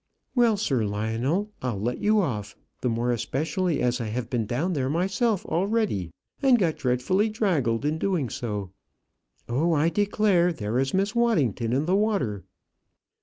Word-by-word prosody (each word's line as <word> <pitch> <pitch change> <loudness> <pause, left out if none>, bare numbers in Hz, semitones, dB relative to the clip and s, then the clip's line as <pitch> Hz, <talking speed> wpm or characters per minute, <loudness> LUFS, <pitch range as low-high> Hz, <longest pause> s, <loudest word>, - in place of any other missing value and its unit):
"Well, 235 -4 +3
Sir 135 - 0
Lionel, 115 - -1
I'll 120 -6 -2
let 120 +4 -2
you 215 0 +3
off; 110 - -3 0.3
the 125 - +1
more 120 +2 0
especially 155 - -1
as 125 0 +1
I 115 - -3
have 115 +2 -4
been 115 -4 -1
down 150 - -1
there 135 -4 -1
myself 195 - 0
already, 190 - 0 0.3
and 265 -3 +5
got 175 -7 0
dreadfully 135 - +1
draggled 145 - 0
in 155 +2 0
doing 175 -9 0
so. 105 -5 -4 0.8
Oh! 155 +8 +1
I 155 +2 +3
declare, 200 -2 +2
there 115 -5 -2
is 135 +4 0
Miss 200 +2 +1
Waddington 145 - +1
in 135 +5 +1
the 180 +3 +2
water." 195 - 0
150 Hz, 160 wpm, -26 LUFS, 120-195 Hz, 0.8 s, and